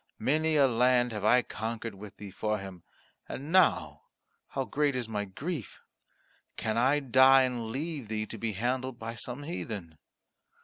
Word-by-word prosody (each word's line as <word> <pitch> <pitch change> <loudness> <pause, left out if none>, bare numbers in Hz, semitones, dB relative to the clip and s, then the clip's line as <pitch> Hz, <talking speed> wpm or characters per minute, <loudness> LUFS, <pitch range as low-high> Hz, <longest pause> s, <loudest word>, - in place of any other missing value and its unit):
Many 155 +3 +1
a 140 -2 +6
land 125 0 +3
have 105 -2 -5
I 125 +3 +5
conquered 115 0 -4
with 100 +1 -11
thee 100 -2 -9
for 105 +2 -1
him, 95 -3 -9 0.5
and 145 +4 -6
now 185 -1 +3 0.4
how 135 -1 -3
great 145 -1 0
is 125 -3 -2
my 105 -2 -2
grief! 140 - -6 0.8
Can 110 -1 -1
I 130 +5 +3
die 130 0 +6
and 125 -3 -2
leave 140 0 -4
thee 110 0 -2
to 110 +1 -8
be 110 -1 -2
handled 125 +4 -2
by 115 -1 -5
some 125 +4 -5
heathen?" 105 - -6
120 Hz, 165 wpm, -30 LUFS, 110-135 Hz, 0.8 s, a